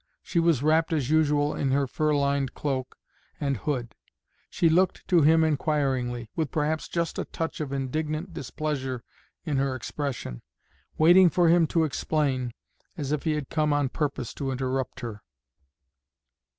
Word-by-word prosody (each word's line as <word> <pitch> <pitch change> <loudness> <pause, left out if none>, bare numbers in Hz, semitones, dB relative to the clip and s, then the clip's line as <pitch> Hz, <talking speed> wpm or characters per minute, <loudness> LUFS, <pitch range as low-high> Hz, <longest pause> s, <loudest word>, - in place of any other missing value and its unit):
She 170 - 0
was 165 -6 +2
wrapped 160 +2 +3
as 145 -3 0
usual 150 -2 +3
in 135 - -1
her 140 +1 +2
fur 150 +3 0
lined 140 -1 0
cloak 130 -3 -3 0.4
and 140 -2 0
hood. 120 -1 -3 0.6
She 170 - +2
looked 180 +4 +2
to 175 -3 +5
him 160 +2 +5
inquiringly, 135 -6 0
with 160 -4 -1
perhaps 155 +1 -1
just 170 -1 -2
a - - -2
touch 165 -1 -4
of 145 -3 -4
indignant 155 +5 -3
displeasure 135 -4 -3 0.4
in 150 -4 -1
her 135 -1 0
expression, 130 - -4 0.6
waiting 175 +3 +7
for 170 +1 +3
him 170 -1 +5
to 165 +1 +2
explain, 140 -4 0 0.5
as 145 -3 -3
if 150 +1 -1
he 160 - +2
had 150 -2 -3
come 150 -2 +2
on 145 -2 +1
purpose 135 -5 -3
to 135 - -3
interrupt 130 -1 -2
her. 110 -4 -6
145 Hz, 155 wpm, -26 LUFS, 135-160 Hz, 0.6 s, waiting